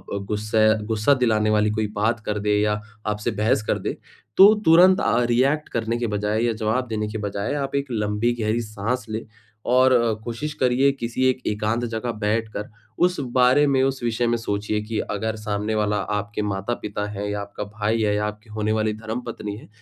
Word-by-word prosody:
अ, - - -1
गुस्से 110 +1 +1 0.2
गुस्सा 110 +5 +2
दिलाने 110 -2 +2
वाली 105 0 +2
कोई 110 - +1
बात 110 +3 +1
कर 105 0 -1
दे 105 - +4
या 105 0 0 0.3
आपसे 105 +2 -1
बहस 110 0 +2
कर - - +1
दे, - - -4 0.4
तो 200 +3 +9
तुरंत 180 +4 +7
अ, 115 - +2
रिएक्ट 135 +6 +1
करने 115 0 -1
के 120 -1 -1
बजाए 105 +1 -1
या 120 -1 +1
जवाब 110 +3 -1
देने 105 -1 -2
के 110 - -4
बजाय, 100 +1 -3
आप 140 -1 -3
1 140 0 -1
लम्बी 105 +1 0
गहरी 110 +2 0
साँस 110 +3 -3
लें 110 +1 -3 0.5
और 130 +1 +5
अ, 120 -2 +3
कोशिश 135 +7 -4
करिए 130 +2 +4
किसी 120 +2 -1
एक 130 0 -1
एकांत 110 +3 0
जगह 115 +1 -3
बैठ 110 +1 -1
कर, 105 - -5 0.3
उस 180 -1 +2
बारे 130 +3 +5
में 135 -2 +3
उस 135 -1 -1
विषय 120 +1 0
में 120 0 +1
सोचिए 105 -1 -2
कि 105 +1 -4
अगर 110 +2 -2
सामने 105 0 -2
वाला 105 -1 +1 0.2
आपके 105 +1 -3
माता-पिता 105 +1 -3
है 105 0 -4
या 105 0 -3
आपका 100 +1 -6
भाई 105 +2 -1
है 105 -1 +2
या 105 0 0
आपकी 105 +1 -9
होने 110 0 -1
वाली 110 0 0
धर्मपत्नी 110 -1 -5
है, - - -13
110 Hz, 200 wpm, -23 LUFS, 105-120 Hz, 0.5 s, तो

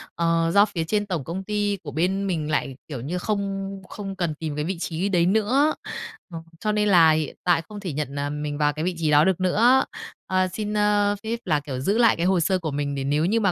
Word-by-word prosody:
ờ, 165 0 +1
do 200 +1 +7
phía 180 -6 -3
trên 205 +5 0
tổng 175 -8 -3
công 180 +6 -5
ty 205 0 -1
của 145 - -6
bên 185 +7 0
mình 155 -5 -2
lại, 135 -3 -1
kiểu, 135 -6 -6
như 160 +8 -3
không 195 0 -2 0.2
không 195 -2 -6
cần 175 -4 -1
tìm 155 -1 -5
cái 150 0 -2
vị 185 +1 -3
trí 170 +3 -2
đấy 175 -3 +3
nữa. 220 - +2 0.6
Ờ, 165 - -4 0.2
cho 215 - 0
nên 210 0 +1
là 170 -4 +7
hiện 155 -2 -1
tại 175 -2 +3
không 210 -1 -7
thể 180 -7 -5
nhận, 140 -1 -4
ờ, 145 0 -2
mình 150 0 -4
vào 150 -1 +2
cái 155 +2 -3
vị 180 0 -1
trí 155 -2 0
đó 145 +1 +6
được 190 -3 +1
nữa. 230 +8 +4 0.4
Ờ, 185 0 +2
xin, 210 +1 -3
ơ, 205 0 +2
phép 230 +1 -3
là, 155 -4 +2
kiểu, 140 -3 -5
giữ 195 +11 +1
lại 235 -2 +5
cái 170 - -1
hồ 185 -1 +3
sơ 185 +3 +1
của 160 -3 -3
mình 140 0 -2
để 135 - -3
nếu 145 +3 +1
như 220 +6 +2
mà 200 -4 +2
180 Hz, 255 wpm, -24 LUFS, 155-205 Hz, 0.6 s, do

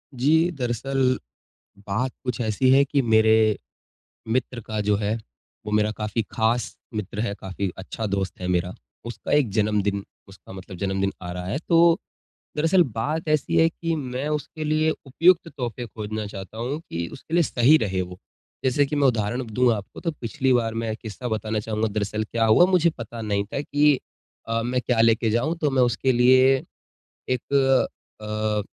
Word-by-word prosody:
जी, 160 +7 +3
दरअसल 130 +2 0 0.7
बात 120 +6 -1
कुछ 125 -3 -3
ऐसी 115 +3 +1
है 135 +1 +6
कि 140 0 +1
मेरे 110 -2 +4 0.8
मित्र 125 0 -1
का 110 -1 -2
जो 105 0 +2
है 105 +2 -1 0.5
वो 105 - -4
मेरा 105 0 +2
काफ़ी 105 +2 -1
ख़ास 115 +2 0 0.2
मित्र 105 -1 -4
है 110 -3 -1
काफ़ी 95 0 -3
अच्छा 105 +4 -5
दोस्त 95 -2 -3
है 90 - -3
मेरा। 90 0 0 0.3
उसका 120 0 -5
एक 145 -5 +4
जन्मदिन 105 -2 0 0.2
उसका 95 0 -14
मतलब 95 0 -9
जन्मदिन 95 0 -1
आ 90 - -5
रहा 90 0 -5
है 100 +8 -2
तो 170 0 +5 0.6
दरअसल 165 +4 +4
बात 155 +8 -2
ऐसी 155 -3 +1
है 165 - +6
कि 165 0 -3
मैं 135 -1 -3
उसके 150 +1 -3
लिए 155 +1 +2 0.2
उपयुक्त 170 +6 +3
तोहफ़े 120 -1 -4
खोजना 110 -1 -5
चाहता 100 +1 -9
हूँ 125 +6 -3
कि 85 0 -3
उसके 155 - -12
लिए 170 0 +5
सही 135 +2 +4
रहे 95 -8 -1
वो। 90 0 -7 0.5
जैसे 135 +2 +3
कि 140 - -3
मैं 145 -1 +4
उदाहरण 120 +1 0
दूँ 125 +1 +4
आपको 100 -3 -7
तो 165 - -1
पिछली 130 +2 0
बार 115 -2 +1
मैं 110 -1 -2
किस्सा 110 +2 -7
बताना 110 0 -1
चाहूँगा 110 +1 -1
दरअसल 105 0 -2
क्या 115 +1 0
हुआ 110 +11 +6
मुझे 180 -2 +3
पता 115 -1 -7
नहीं 100 -2 0
था 120 +7 -4
कि 145 -1 +3 0.5
अ, 115 0 0
मैं 125 +1 0
क्या 115 -1 +1
लेके 115 0 +3
जाऊँ? 120 +9 0
तो 155 -3 +1
मैं 130 -1 +3
उसके 125 +2 +2
लिए। 130 +2 +5 0.7
एक 130 +2 -2 0.7
अ, 105 0 -1
115 Hz, 175 wpm, -24 LUFS, 105-135 Hz, 0.8 s, है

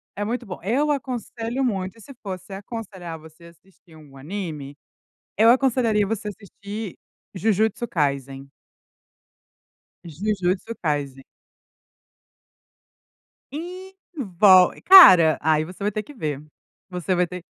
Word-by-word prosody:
é 205 - -3
muito 240 +2 -3
bom. 185 - -8
Eu 280 +9 +1
aconselho 250 -2 -4
muito 195 -3 -3
e - - -16
se 275 - -13
fosse 190 -1 -8
aconselhar 195 -5 -8
você 160 +2 -17
a - - -12
assistir 170 -1 -23
um 145 -3 -16
anime, 150 -3 -7 0.6
eu 225 - +5
aconselharia 235 -5 +2
você 215 0 -4
a - - -3
assistir 205 0 -9 0.4
Jujutsu 220 +4 0
Kaysen. 140 -3 -3 1.5
Jujutsu 185 +4 -2
Kaysen. 140 -3 -2 2.3
Envol 300 - +2
cara, 185 - +9
aí 155 0 +1
você 180 +4 -11
vai 205 - 0
ter 215 - -3
que 290 - -14
ver, 150 - -4 0.5
você 180 +1 -2
vai 180 0 +1
ter 180 0 -9
195 Hz, 120 wpm, -23 LUFS, 165-230 Hz, 2.3 s, cara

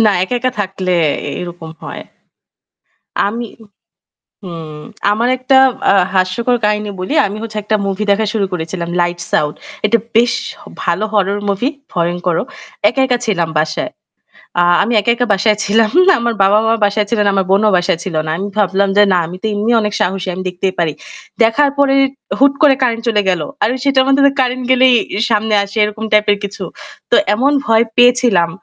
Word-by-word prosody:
না 215 - +5
একা, 190 +7 -2
একা 255 +1 -1
থাকলে 190 -2 -3 0.5
এরকম 175 -2 -8
হয়। - - -7 1.3
আমি 230 +3 -4 1.0
হুম, 160 -4 -8 0.3
আমার 230 +4 0
একটা, 255 +1 +2 0.4
আ - - +3 0.2
হাস্যকর 190 +7 +1
কাহিনী 210 0 0
বলি। 185 +11 -3
আমি 200 +1 -6
হচ্ছে 220 -2 -5
একটা 215 +1 0
movie 195 +2 -2
দেখা 210 +2 +2
শুরু 215 -3 0
করেছিলাম 170 0 -4
'Light 175 0 -1
Sound' 150 0 0 0.3
এটা 230 +2 +2 0.2
বেশ 235 +1 +4 0.3
হ - - -15 0.2
ভালো 175 +5 0
horror 200 0 +1
movie, 200 +9 -1 0.2
ভয়ঙ্করও। 175 0 -1 0.4
একা, 245 +5 -2
একা 250 -2 0
ছিলাম 175 -7 0
বাসায়। 155 - -2 0.7
আ - - +4 0.2
আমি 230 - -1
একা, 205 - 0
একা 245 +1 -1
বাসায় 210 +2 +1
ছিলাম। 215 +1 +2 0.3
আমার 235 0 -1
বাবা-মা 215 +3 +3
বাসায় 205 +1 0
ছিলেন, 210 -3 +1
আমার 195 -1 +1
বোনও 205 +2 +3
বাসায় 175 -1 0
ছিল 190 - -5
না। - - -3
আমি 200 +2 -4
ভাবলাম 200 -1 +1
যে 205 - +7
না 180 - +3
আমি 175 +3 -8
তো - - -2
এমনি 210 +3 0
অনেক 210 -1 -2
সাহসী, 190 0 -1
আমি 185 - -5
দেখতেই 185 +1 -2
পারি। 165 -3 0 0.5
দেখার 255 +6 +3
পরে 280 -1 +3 0.5
হুট 280 0 +5
করে 290 -3 +6
কারেন্ট 230 -2 0
চলে 210 -3 +2
গেল। 180 -3 +1 0.2
আর - - +3
আমি 255 - -3
সেটার 270 -2 +3
মাধমে 280 +1 +4
কারেন্ট 255 0 -1
গেলেই 260 0 +5 0.2
ই - - -1
সামনে 215 0 +1
আসে 200 +2 -12
এরকম 210 +1 -5
type 210 0 +3
এর 205 - -2
কিছু। 200 0 -7 0.5
তো - - +5 0.2
এমন 270 +6 +1
ভয় 225 0 +3
পেয়েছিলাম 245 -8 +4
210 Hz, 180 wpm, -15 LUFS, 185-235 Hz, 1.3 s, যে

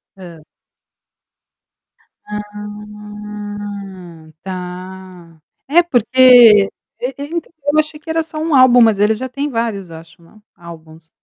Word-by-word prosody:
Hã. 175 -4 -12 1.9
Ah 210 -4 -9
tá. 180 -2 -9 0.3
É 340 +5 +4
porque, 245 - +6 0.3
eu 250 +2 -4
eu 285 - -5
então, 330 +2 -6 0.2
eu 310 - +4
achei 305 0 -2
que 320 +1 -14
era 325 0 0
só 310 -1 -10
um 315 -1 0
álbum, 255 -2 +6
mas 220 -3 +4
ele 210 +2 +3
já 260 +4 -5
tem 280 +3 -4
vários 225 -7 -3
eu 165 - -10
acho 165 +2 -17
na 170 +6 -21 0.2
álbuns. 160 -1 -14
210 Hz, 130 wpm, -17 LUFS, 185-255 Hz, 1.9 s, porque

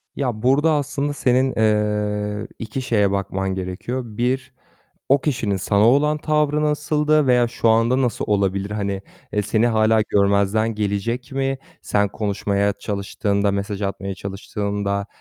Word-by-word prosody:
Ya, 120 -5 -2
burada 145 +5 +4
aslında 145 0 -1
senin, 130 -1 +2
eee, 105 -1 0
2 120 +4 -4
şeye 105 -5 +2
bakman 95 -1 -2
gerekiyor. 95 +8 -4
1 125 +4 -2 0.6
o 140 0 +4
kişinin 115 -9 -1
sana 100 +3 +2
olan 150 +3 +3
tavrı 150 -1 +1
nasıldı 150 0 +2
veya 125 -1 +4
şu 115 -1 0
anda 115 +4 +3
nasıl 120 -4 -1
olabilir? 100 -1 0
Hani, 100 -2 -2 0.3
eee, 105 -1 +1
seni 110 +3 +1
hâlâ 110 -1 +3
görmezden 100 +2 +2
gelecek 110 +6 -2
mi 135 0 -1 0.2
sen 100 -1 +1
konuşmaya 100 -1 0
çalıştığında, 100 0 -1
mesaj 100 +1 -3
atmaya 100 0 -3
çalıştığında 100 +1 -3
110 Hz, 135 wpm, -21 LUFS, 100-130 Hz, 0.6 s, burada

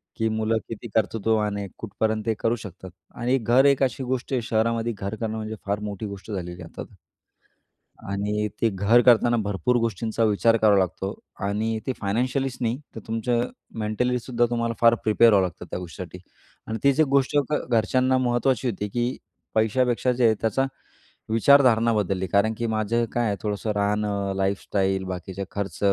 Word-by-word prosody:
की 110 -1 0
मुलं 110 +1 0
किती 115 +1 -7
कर्तृत्वाने 105 -1 0
कुठपर्यंत 110 0 -2
ते 115 - +1
करू 115 +1 +1
शकतात. 95 -4 -10 0.3
आणि 125 +3 +1
घर 125 +3 +3
एक 140 -1 +4
अशी 130 +1 -1
गोष्ट 130 +1 -3
आहे, 125 - +1
शहरामध्ये 115 +1 0
घर 100 +3 -4
करणं 110 0 -3
म्हणजे 110 0 -4
फार 100 +1 -1
मोठी 105 0 -5
गोष्ट 100 +1 -8
झालेली 90 -3 -5
आहे 80 - -9
आता, - - -7 1.3
आणि 105 +1 -1
ते 115 - +4
घर 100 +5 +4
करताना 120 0 +5
भरपूर 105 +5 0
गोष्टींचा 115 0 -1
विचार 115 +2 +3
करावा 105 -2 +4
लागतो 95 +2 -2 0.3
आणि 110 +2 -1
ते 130 - 0
फायनान्शियलीच 125 +5 -1
नाही, 120 +3 -1 0.2
तर - - -5
तुमचं 120 +2 0 0.3
मेंटलीसुद्धा 120 +2 0
तुम्हाला 115 -1 -1
फार 115 0 +6
प्रिपेअर 110 +1 +5
व्हावं 95 -2 +4
लागतं 85 - -10
त्या - - -3
गोष्टीसाठी 90 +1 -8 0.5
आणि 110 0 -3
तीच 140 +2 +3
1 155 - +6
गोष्ट 140 +1 +2
घ - - +3 0.2
घरच्यांना 130 +4 +2
महत्त्वाची 125 0 +1
होती, 105 -1 -3
की 120 +3 -1 0.4
पैशापेक्षा 120 +3 +2
जे 125 0 +2
आहे 110 -1 +4
त्याचा 115 +4 +1 0.6
विचारधारणा 115 -1 +5
बदलली, 95 -2 -1
कारण 100 +5 +2
की 115 - -2
माझं 110 +2 0
काय 120 -2 +1
आहे 100 - 0
थोडंसं 105 0 -2
राहणं, 100 -1 0
लाईफस्टाईल, 95 0 0
बाकीचे 95 +1 -5
खर्च 100 -5 -4
110 Hz, 165 wpm, -24 LUFS, 100-120 Hz, 1.3 s, फार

